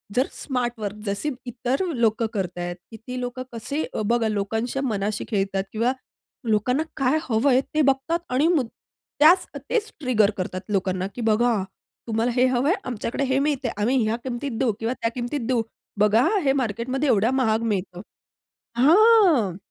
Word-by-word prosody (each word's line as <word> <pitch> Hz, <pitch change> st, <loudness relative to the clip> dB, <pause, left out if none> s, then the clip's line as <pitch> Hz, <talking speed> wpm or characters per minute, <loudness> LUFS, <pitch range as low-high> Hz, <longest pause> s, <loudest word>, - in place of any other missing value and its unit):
जर 255 Hz, +3 st, +3 dB
smart 250 Hz, -3 st, -2 dB
work 205 Hz, -1 st, -4 dB
जसे 200 Hz, +9 st, -2 dB, 0.2 s
इतर 250 Hz, +7 st, -2 dB
लोकं 230 Hz, -1 st, +1 dB
करतायेत. 175 Hz, -3 st, -3 dB, 0.2 s
किती 240 Hz, +3 st, -7 dB
लोकं 250 Hz, +1 st, -4 dB
कसे 265 Hz, +7 st, -3 dB, 0.2 s
बघा 235 Hz, +1 st, +2 dB
लोकांच्या 220 Hz, +5 st, -2 dB
मनाशी 210 Hz, -3 st, -2 dB
खेळतात 195 Hz, -3 st, 0 dB
किंवा 230 Hz, +4 st, +1 dB, 0.6 s
लोकांना 250 Hz, +7 st, +2 dB
काय 270 Hz, +3 st, +2 dB
हवंय 250 Hz, +3 st, +3 dB
ते 310 Hz, -, +4 dB
बघतात. 275 Hz, +4 st, +1 dB
आणि 265 Hz, +5 st, +2 dB, 0.7 s
त्याच 320 Hz, +5 st, +6 dB, 0.2 s
तेच 445 Hz, -3 st, 0 dB
ट्रिगर 240 Hz, -8 st, +3 dB
करतात 185 Hz, 0 st, -3 dB
लोकांना, 190 Hz, -2 st, 0 dB
की 245 Hz, -, -5 dB
बघा 225 Hz, -1 st, +2 dB, 0.4 s
तुम्हाला 225 Hz, +2 st, 0 dB
हे 250 Hz, -, +4 dB
हवं 255 Hz, +2 st, +1 dB
आहे, 360 Hz, -, +4 dB
आमच्याकडे 245 Hz, +2 st, -3 dB
हे 265 Hz, 0 st, +1 dB
मिळतंय. 275 Hz, -4 st, 0 dB
आम्ही 235 Hz, +6 st, +1 dB
ह्या 215 Hz, +1 st, 0 dB
किमतीत 260 Hz, +2 st, -4 dB
देऊ 255 Hz, -4 st, +2 dB
किंवा 225 Hz, +2 st, -1 dB
त्या 230 Hz, -, +1 dB
किमतीत 245 Hz, +3 st, -3 dB
देऊ. 250 Hz, -2 st, +2 dB, 0.4 s
बघा 210 Hz, +3 st, +4 dB, 0.2 s
हे 270 Hz, -, +3 dB
मार्केटमध्ये 255 Hz, +2 st, -1 dB
एवढा 220 Hz, +4 st, +3 dB
महाग 225 Hz, -4 st, +1 dB
मिळतं. 185 Hz, -2 st, -3 dB, 0.8 s
हां. 330 Hz, -, +5 dB
240 Hz, 150 wpm, -24 LUFS, 215-265 Hz, 0.8 s, त्याच